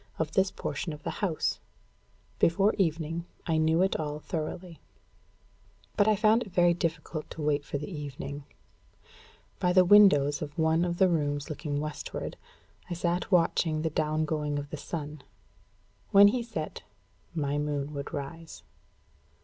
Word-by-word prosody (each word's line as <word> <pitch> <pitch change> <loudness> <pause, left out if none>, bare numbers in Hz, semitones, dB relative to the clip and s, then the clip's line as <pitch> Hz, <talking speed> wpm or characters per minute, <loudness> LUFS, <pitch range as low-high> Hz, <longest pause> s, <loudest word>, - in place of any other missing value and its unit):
of 160 -1 -2
this 190 +3 +2
portion 170 -3 -4
of 150 - -11
the - - -2
house. 175 -6 0 0.8
Before 195 +5 +3
evening, 165 -1 -1 0.2
I 160 -2 +1
knew 160 +3 +3
it 190 - +1
all 150 -1 -3
thoroughly. 165 +2 -5 1.2
But 205 - +3
I 215 - +5
found 215 +3 +4
it 215 -6 -7
very 175 -1 +4
difficult 165 -2 -3
to 160 - -7
wait 145 -1 +1
for 145 - -4
the 150 - -6
evening. 145 -3 -6 1.2
By 180 0 +2
the 185 0 +6
windows 175 -8 +6
of 145 -1 -6
one 160 +1 +2
of 170 -1 -2
the 190 - +5
rooms 145 -3 -1
looking 145 -1 -3
westward, 150 0 -5 0.5
I 175 - -2
sat 175 +3 -1
watching 165 -3 +2
the 160 - -1
down 155 0 0
going 150 -2 -2
of 145 0 -5
the - - -3
sun. 150 0 -6 0.9
When 200 +1 +8
he 245 +3 -1
set, 215 -10 -5 0.5
my 145 -2 -1
moon 145 0 -2
would 140 -1 -5
rise. 160 +4 -7
160 Hz, 155 wpm, -29 LUFS, 150-175 Hz, 1.2 s, When